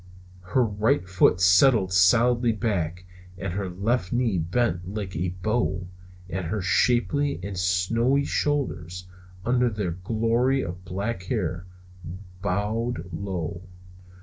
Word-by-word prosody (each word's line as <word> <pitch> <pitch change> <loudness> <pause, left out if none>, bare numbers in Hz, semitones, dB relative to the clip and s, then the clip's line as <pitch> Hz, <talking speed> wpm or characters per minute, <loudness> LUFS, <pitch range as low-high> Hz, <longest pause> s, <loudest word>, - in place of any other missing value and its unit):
Her 110 +8 +1
right 110 +2 0
foot 90 -1 +3
settled 95 +2 +5
solidly 115 +6 +4
back, 90 -6 -2 0.3
her 95 +1 -3
left 100 +2 -1
knee 120 -6 +1
bent 90 0 -1
like 100 -4 -5
a 90 +3 -2
bow, 105 -5 0 0.5
her 95 +3 -2
shapely 125 +9 +2
and 100 0 -5
snowy 115 +10 +1
shoulders, 90 - -2 0.4
under 125 0 +2
their 105 -5 -3
glory 115 +8 0
of 90 +1 -6
black 95 +2 -4
hair, 90 -5 -2 0.7
bowed 105 -1 -2
low. 85 -2 -4
100 Hz, 110 wpm, -25 LUFS, 90-120 Hz, 0.7 s, settled